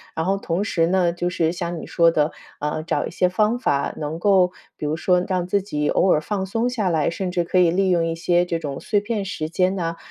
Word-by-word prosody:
然 160 - -1
后 195 +2 +1
同 180 0 -2
时 165 -6 +1
呢， 180 -1 +2
就 175 +1 -2
是 165 -2 0
像 175 -1 -4
你 - - -7
说 170 -1 +4
的， 150 -1 +1 0.3
啊， 150 +1 -2
找 165 - -1
一 - - -8
些 180 +1 +2
方 215 +5 +1
法 140 - 0
能 150 +1 -4
够 185 -1 +4 0.3
比 - - -5
如 150 +1 0
说 180 +2 +2
让 185 -2 0
自 200 +2 +1
己 150 -7 -2
偶 185 - +3
尔 - - +4
放 195 +3 -2
松 225 +5 -1
下 220 -7 -1
来， 160 -3 +1
甚 185 +2 -3
至 175 -1 0
可 170 - -1
以 175 -2 +5
利 190 +2 +1
用 170 -2 +2
一 165 - -1
些 175 +1 +2
这 170 -1 -1
种 145 -4 -5
碎 205 - +1
片 210 -1 -2
时 160 -5 -4
间 185 +2 +1
呢， 170 -3 -2
175 Hz, 275 characters per minute, -22 LUFS, 165-190 Hz, 0.3 s, 以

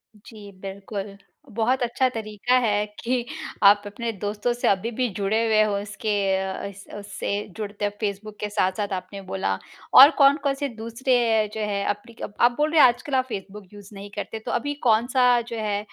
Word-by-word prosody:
जी 210 -1 -13
बिल्कुल, 195 +1 -6 0.3
बहुत 235 +4 0
अच्छा 245 +2 +1
तरीक़ा 220 +1 -1
है 210 -1 +1
कि 245 0 -1 0.4
आप 205 +1 +7
अपने 230 +3 -4
दोस्तों 210 +3 -2
से 240 - -1
अभी-भी 230 +6 +1
जुड़े 210 +3 +1
हुए 215 -1 +4
हो 205 -1 0
इसके 210 +1 -5 0.3
अ, 190 0 -4
इस 200 0 -9
उस - - -14
उससे 205 -1 -5 0.3
जुड़ते 205 -1 -3
फेसबुक 210 0 -4
के 210 - -3
साथ-साथ 200 0 -1
आपने 195 +2 -6
बोला 95 0 -1 0.4
और 280 +3 +11
कौन-कौन 280 0 +4
से 285 0 -3
दूसरे 230 +3 -1 0.4
जो 220 - -4
हैं 200 -1 -1
एप्लीक 210 +3 -5 0.2
आप 240 - +6
बोल 305 +1 +1
रहे 315 -3 +5
हो - - +10
आजकल 245 +3 -2
आप 255 - +2
फेसबुक 200 -1 -7
यूज़ 205 -1 -12
नहीं 200 +1 -9
करते 220 - -5
तो - - -3
अभी 290 0 -1
कौन-सा 245 +3 +3
जो 235 -1 -7
है 210 -2 -1
215 Hz, 180 wpm, -24 LUFS, 200-240 Hz, 0.4 s, और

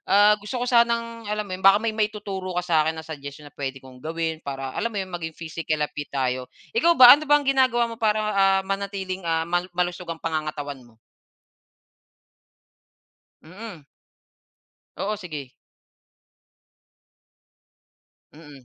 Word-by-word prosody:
ah, 205 +2 +6
gusto 205 +5 -5
ko 245 - -1
sanang 235 -2 +1
alam 210 0 -2
mo 195 - -9
'yon, 185 - -5
baka 195 +1 +7
may 225 - +1
maituturo 205 -4 -3
ka 180 - 0
sa 175 -2 +1
akin 160 - -2
na 160 - -7
suggestion 145 -1 -9
na 145 - -13
puwede 135 -1 -5
kong 130 -1 -14
gawin 160 +1 -3
para 135 -3 -5
alam 230 - -1
mo 225 - -9
'yon, 190 -2 -4
maging 160 -2 -5
physically 160 -1 -3 0.2
fit 145 - -6
tayo, 130 -2 -2 0.2
ikaw 340 -7 +3
ba 250 -1 +11
ano 300 +1 +2
ba 295 - +7
ang 295 - -2
ginagawa 255 -4 +2
mo 230 - -11
para 215 -1 +2
ah, 195 -2 +3
manatiling 195 -1 -3
ah, 165 0 +1
ma-malusog 175 +1 -2
ang 165 - -3
pangangatawan 155 -3 -3
mo? 120 -2 -20 2.4
Mm. 180 -1 -11 1.1
Oo, 210 +2 -2
sige 150 -9 -8 2.8
Mm. 145 -4 -14
185 Hz, 150 wpm, -24 LUFS, 155-215 Hz, 2.8 s, ba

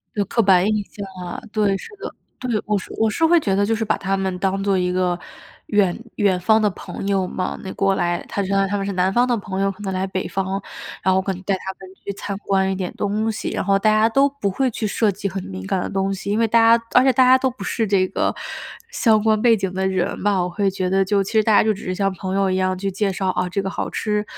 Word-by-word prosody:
对， 205 - +1
刻 230 - +1
板 190 -3 +4
印 215 -1 +1
象 200 0 -8 0.2
啊， 175 - -6
对， 205 -2 +1
是 - - -10
的。 450 - -6 0.3
对， 235 -5 -1
我 210 -1 +2
是 190 - -7
我 220 - +3
是 325 +9 +1
会 340 +1 +5
觉 200 -10 0
得 200 +1 +2
就 225 - +1
是 225 - -2
把 215 - 0
他 195 0 -1
们 190 -1 -2
当 195 +1 -1
做 195 -1 +2
一 180 0 0
个 180 -1 0 0.5
远 200 -4 +2 0.2
远 195 -3 +2
方 220 +4 +3
的 210 - +3
朋 195 0 -7
友 195 -2 +1
嘛。 185 0 -3
那 190 - -6
过 195 0 +1
来 175 -2 -1
他 200 - -1
就 - - -4
相 195 - +2
当 195 - +2
于 - - -8
他 205 - 0
们 195 - -2
是 200 - -2
南 185 0 +1
方 245 +5 +3
的 245 - +2
朋 190 -2 -5
友， 195 0 +1
可 195 +1 -13
能 195 -2 -3
来 185 0 -1
北 190 -1 -3
方， 195 0 -2 0.4
然 190 - +2
后 190 - +3
可 195 0 -2
能 185 - -9
带 195 +1 0
他 190 +1 -6
们 190 0 -13
去 200 - -3
参 200 0 -5
观 195 -1 +1
一 - - -1
点 185 -1 -4
东 215 +2 -1
西。 215 - -4
然 - - -3
后 195 0 +3
大 215 - +3
家 215 +1 +4
都 275 +5 +3
不 275 -8 -3
会 260 +7 +1
去 225 -1 -4
涉 215 +1 +1
及 200 - -4
很 190 -1 -4
敏 95 0 -7
感 180 - -1
的 - - -3
东 195 0 -1
西， 195 +1 -6
因 205 - +1
为 230 0 +3
大 230 +1 +5
家 230 - -12
而 250 - +6
且 265 - +5
大 255 +1 +4
家 260 +1 +6
都 260 - +1
不 255 - -9
是 225 -2 -1
这 190 -2 +2
个 - - -1 0.6
相 220 -3 +3
关 215 -1 +2
背 230 -1 +5
景 190 -2 -3
的 190 0 0
人 185 -2 -1
嘛。 200 -2 +1
我 - - -1
会 195 +3 0
觉 185 -1 -2
得 195 0 +3
就 200 +1 +1
其 195 - -7
实 220 - +4
大 215 -1 +3
家 - - +5
就 215 0 +2
只 205 - -10
是 185 - -2
像 195 0 0
朋 190 +1 -4
友 195 -1 +2
一 - - +1
样 185 0 0
去 195 +1 -2
介 195 +1 0
绍， 190 0 -2
哦， 180 0 -1
这 195 +1 -1
个 195 - -2
好 - - -3
吃、 210 -1 -1
195 Hz, 320 characters per minute, -21 LUFS, 190-215 Hz, 0.6 s, 而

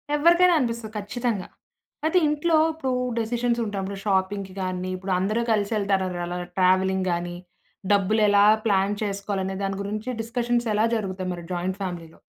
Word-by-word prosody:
ఎవ్వరికైనా 345 +4 +5
అనిపిస్తది 235 -4 -2
ఖచ్చితంగా. 210 -1 -2 0.6
అయితే, 320 +3 +3
ఇంట్లో 305 +2 +2 0.2
ఇప్పుడూ 270 -5 -3 0.3
డెసిషన్సుంటాం. 230 -3 -1
ర - - -5
షాపింగ్‌కి 195 -1 0
గానీ, 185 0 -3
ఇప్పుడు 190 +1 -3
అందరూ 215 +5 0
కలిసెళ్తారారలా 195 -4 0 0.2
ట్రావెలింగ్ 185 0 +3
గానీ, 175 0 -2 0.6
డబ్బులు 205 +2 +2
ఎలా 205 0 +5 0.2
ప్లాన్ 195 0 +2
చేసుకోవాలనే 195 -1 -2
దాని 195 0 -2
గురించి 210 +4 -4
డిస్కషన్సెలా 235 -2 0
జరుగుతాయి 190 -4 -3
మరి 175 -1 -8
జాయింట్ 180 +2 -2
ఫ్యామిలీలో? 170 -4 -6
200 Hz, 125 wpm, -25 LUFS, 190-230 Hz, 0.6 s, ఎవ్వరికైనా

